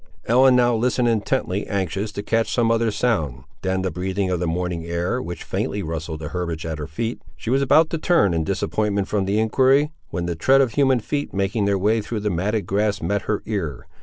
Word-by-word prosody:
Ellen 130 Hz, +2 st, +5 dB
now 120 Hz, -1 st, +4 dB
listened 120 Hz, +1 st, +1 dB
intently 110 Hz, -3 st, 0 dB
anxious 100 Hz, +1 st, -2 dB
to 100 Hz, -, -4 dB
catch 115 Hz, +1 st, 0 dB
some 115 Hz, -2 st, +2 dB
other 115 Hz, 0 st, +2 dB
sound, 80 Hz, -, -1 dB, 0.2 s
than 95 Hz, 0 st, -1 dB
the 95 Hz, -, -1 dB
breathing 95 Hz, +1 st, -2 dB
of 90 Hz, -, 0 dB
the 90 Hz, -, -1 dB
morning 85 Hz, 0 st, -2 dB
air, 85 Hz, +9 st, -2 dB
which 85 Hz, -7 st, -6 dB
faintly 100 Hz, 0 st, -2 dB
rustled 80 Hz, -1 st, -5 dB
the 75 Hz, -, -5 dB
herbage 85 Hz, -2 st, -3 dB
at 80 Hz, -1 st, -4 dB
her 75 Hz, -, -5 dB
feet. 110 Hz, +10 st, -4 dB, 0.2 s
She 115 Hz, -, -4 dB
was 135 Hz, +1 st, +3 dB
about 155 Hz, +4 st, +4 dB
to 165 Hz, -, -1 dB
turn 160 Hz, -, +3 dB
in 80 Hz, -1 st, 0 dB
disappointment 100 Hz, +2 st, -1 dB
from 100 Hz, -1 st, 0 dB
the 100 Hz, +2 st, 0 dB
enquiry, 135 Hz, +6 st, +3 dB, 0.2 s
when 90 Hz, -1 st, -3 dB
the 85 Hz, -1 st, -2 dB
tread 135 Hz, +12 st, +4 dB
of 130 Hz, -4 st, +3 dB
human 135 Hz, -3 st, +3 dB
feet 145 Hz, +4 st, -3 dB
making 100 Hz, +2 st, 0 dB
their 100 Hz, -1 st, +2 dB
way 110 Hz, +4 st, +2 dB
through 110 Hz, 0 st, -4 dB
the 105 Hz, 0 st, -1 dB
matted 100 Hz, +5 st, -1 dB
grass 105 Hz, +1 st, 0 dB
met 100 Hz, -1 st, -1 dB
her 105 Hz, -, 0 dB
ear. 85 Hz, -, -3 dB
100 Hz, 220 wpm, -22 LUFS, 90-115 Hz, 0.2 s, Ellen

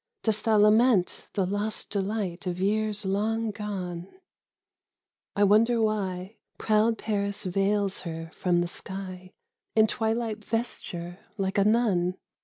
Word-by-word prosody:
Dost 215 Hz, -1 st, 0 dB
thou 220 Hz, -1 st, +4 dB
lament 210 Hz, -1 st, +4 dB
the 195 Hz, -, +2 dB
lost 205 Hz, +3 st, -3 dB
delight 195 Hz, -3 st, -2 dB
Of 180 Hz, 0 st, -2 dB
years 210 Hz, +1 st, 0 dB
long 215 Hz, +3 st, 0 dB
gone? 185 Hz, -4 st, -5 dB, 1.3 s
I 205 Hz, -, +3 dB
wonder 225 Hz, +4 st, +4 dB
why 200 Hz, -2 st, -1 dB, 0.2 s
Proud 220 Hz, +1 st, +2 dB
Paris 200 Hz, -2 st, -2 dB
veils 195 Hz, +1 st, 0 dB
her 165 Hz, -1 st, -6 dB
from 175 Hz, -1 st, +1 dB
the 175 Hz, -, 0 dB
sky 185 Hz, 0 st, -7 dB, 0.4 s
In 220 Hz, -1 st, +6 dB
twilight 220 Hz, 0 st, -1 dB
vesture 190 Hz, -6 st, -4 dB, 0.2 s
like 195 Hz, 0 st, 0 dB
a -, -, +5 dB
nun? 200 Hz, -5 st, +2 dB
205 Hz, 125 wpm, -27 LUFS, 185-220 Hz, 1.3 s, In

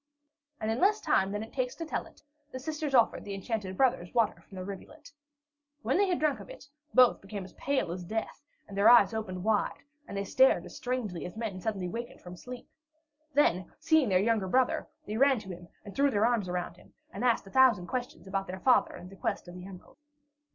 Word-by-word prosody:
And 220 Hz, 0 st, -1 dB
in 225 Hz, -, -1 dB
less 415 Hz, +3 st, +4 dB
time 190 Hz, +1 st, +2 dB
than 205 Hz, +1 st, -3 dB
it 225 Hz, -, -11 dB
takes 255 Hz, -1 st, -2 dB
to 330 Hz, -, -5 dB
tell -, -, -3 dB
it, -, -, -21 dB, 0.3 s
the -, -, -5 dB
sisters 300 Hz, +1 st, -3 dB
offered 235 Hz, -3 st, +3 dB
the 200 Hz, -1 st, -5 dB
enchanted 195 Hz, -2 st, -4 dB
brothers 235 Hz, -9 st, +2 dB
water 230 Hz, -2 st, +2 dB
from 195 Hz, -, -13 dB
the 185 Hz, -, -4 dB
rivulet. 245 Hz, +11 st, -10 dB, 0.7 s
When -, -, +1 dB
they 400 Hz, -, +4 dB
had 360 Hz, -2 st, +1 dB
drunk 300 Hz, -2 st, +1 dB
of -, -, -11 dB
it, -, -, -11 dB, 0.2 s
both 250 Hz, -1 st, +5 dB
the 195 Hz, -, -16 dB
brothers 195 Hz, -2 st, -7 dB
became -, -, -31 dB, 0.2 s
pale 175 Hz, -, 0 dB
as 180 Hz, +1 st, -5 dB
death, 220 Hz, +9 st, -4 dB, 0.3 s
their 200 Hz, +1 st, +4 dB
eyes 240 Hz, -1 st, +7 dB
opened 185 Hz, -5 st, -4 dB
wide, 215 Hz, -1 st, 0 dB, 0.2 s
and 200 Hz, -, -6 dB
they 200 Hz, -, -1 dB
stared 260 Hz, +7 st, +4 dB
as -, -, -11 dB
strangely 240 Hz, -9 st, -3 dB
as 180 Hz, -, -11 dB
men 210 Hz, -5 st, -4 dB
suddenly 195 Hz, -3 st, -2 dB
waked 235 Hz, +6 st, -6 dB
from 180 Hz, 0 st, -10 dB
sleep. 245 Hz, +6 st, -9 dB, 0.7 s
Then, 185 Hz, -11 st, +2 dB
seeing 315 Hz, -5 st, +3 dB
their 185 Hz, -, +4 dB
younger 210 Hz, 0 st, +1 dB
brother, 255 Hz, +6 st, +1 dB, 0.2 s
they 215 Hz, -, -4 dB
ran 275 Hz, +1 st, +5 dB
to 210 Hz, -3 st, -8 dB
him 175 Hz, -1 st, -8 dB, 0.2 s
and 200 Hz, -, -10 dB
threw 280 Hz, +1 st, +4 dB
their 215 Hz, -4 st, +2 dB
arms 235 Hz, -5 st, +1 dB
about 180 Hz, -1 st, -3 dB
him, -, -, -20 dB, 0.2 s
and -, -, -5 dB
asked 235 Hz, -4 st, +2 dB
a 195 Hz, -, -13 dB
thousand 250 Hz, -8 st, +5 dB
questions 250 Hz, +1 st, -5 dB
about 195 Hz, 0 st, -2 dB
their 185 Hz, +1 st, -6 dB
father 255 Hz, -, +3 dB
and 180 Hz, -, -10 dB
the -, -, -11 dB
quest 185 Hz, -, -3 dB
of 175 Hz, -, -9 dB
the 180 Hz, +1 st, -9 dB
emerald. 190 Hz, +6 st, -13 dB
220 Hz, 225 wpm, -30 LUFS, 190-255 Hz, 0.7 s, eyes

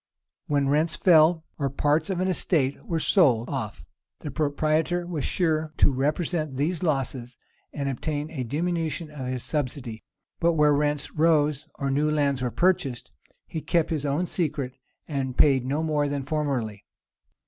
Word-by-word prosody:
When 140 Hz, -2 st, +1 dB
rents 155 Hz, +3 st, +2 dB
fell, 165 Hz, -1 st, +5 dB
or 140 Hz, -1 st, 0 dB
parts 150 Hz, +4 st, +1 dB
of 185 Hz, -2 st, -1 dB
an 185 Hz, -, +1 dB
estate 160 Hz, -, 0 dB
were 170 Hz, -5 st, 0 dB
sold 130 Hz, -, +3 dB
off, 115 Hz, -7 st, -4 dB, 0.4 s
the 150 Hz, -, -5 dB
proprietor 155 Hz, +4 st, 0 dB
was 170 Hz, -5 st, -3 dB
sure 155 Hz, -3 st, 0 dB
to -, -, +4 dB
represent 150 Hz, +1 st, -1 dB
these 160 Hz, +5 st, 0 dB
losses, 135 Hz, -6 st, -2 dB, 0.3 s
and 140 Hz, -1 st, -3 dB
obtain 145 Hz, +3 st, -3 dB
a 135 Hz, -6 st, -3 dB
diminution 160 Hz, +3 st, -2 dB
of 135 Hz, -4 st, -6 dB
his 125 Hz, -1 st, -3 dB
subsidy; 130 Hz, -6 st, -3 dB, 0.4 s
but 170 Hz, 0 st, +3 dB
where 150 Hz, -2 st, +4 dB
rents 145 Hz, 0 st, 0 dB
rose, 150 Hz, -2 st, +2 dB
or 140 Hz, -1 st, -2 dB
new 150 Hz, +3 st, +2 dB
lands 140 Hz, -3 st, +1 dB
were 125 Hz, -, 0 dB
purchased, 140 Hz, -6 st, 0 dB, 0.3 s
he 160 Hz, -, -5 dB
kept 170 Hz, 0 st, +1 dB
his 155 Hz, -3 st, -1 dB
own 145 Hz, +6 st, 0 dB
secret, 150 Hz, -7 st, -2 dB, 0.3 s
and 135 Hz, -4 st, -3 dB
paid 135 Hz, -4 st, +4 dB
no 145 Hz, +4 st, 0 dB
more 150 Hz, -2 st, +1 dB
than 140 Hz, -1 st, -2 dB
formerly. 135 Hz, -8 st, -2 dB
150 Hz, 160 wpm, -26 LUFS, 135-160 Hz, 0.4 s, fell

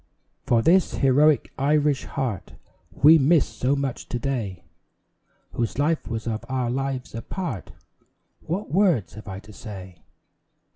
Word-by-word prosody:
For 115 Hz, -1 st, +3 dB
this 180 Hz, +2 st, +4 dB
heroic 145 Hz, +2 st, +3 dB
Irish 145 Hz, 0 st, +2 dB
heart 115 Hz, -8 st, -4 dB, 0.4 s
We 155 Hz, +3 st, +6 dB
miss 150 Hz, +2 st, +4 dB
so 130 Hz, +3 st, -1 dB
much 140 Hz, -3 st, -4 dB
to 120 Hz, -, -2 dB
day, 120 Hz, -9 st, -3 dB, 0.9 s
Whose 115 Hz, 0 st, -2 dB
life 150 Hz, +3 st, 0 dB
was 115 Hz, -1 st, -4 dB
of 115 Hz, -2 st, -3 dB
our 130 Hz, -2 st, -1 dB
lives 135 Hz, 0 st, -3 dB
a 115 Hz, -, -5 dB
part, 180 Hz, -, -5 dB, 0.7 s
What 185 Hz, +6 st, -4 dB
words 175 Hz, -, +2 dB
have 110 Hz, +1 st, -11 dB
I 95 Hz, -1 st, -5 dB
to 105 Hz, +1 st, -14 dB
say? 95 Hz, -4 st, -10 dB
130 Hz, 140 wpm, -24 LUFS, 115-150 Hz, 0.9 s, We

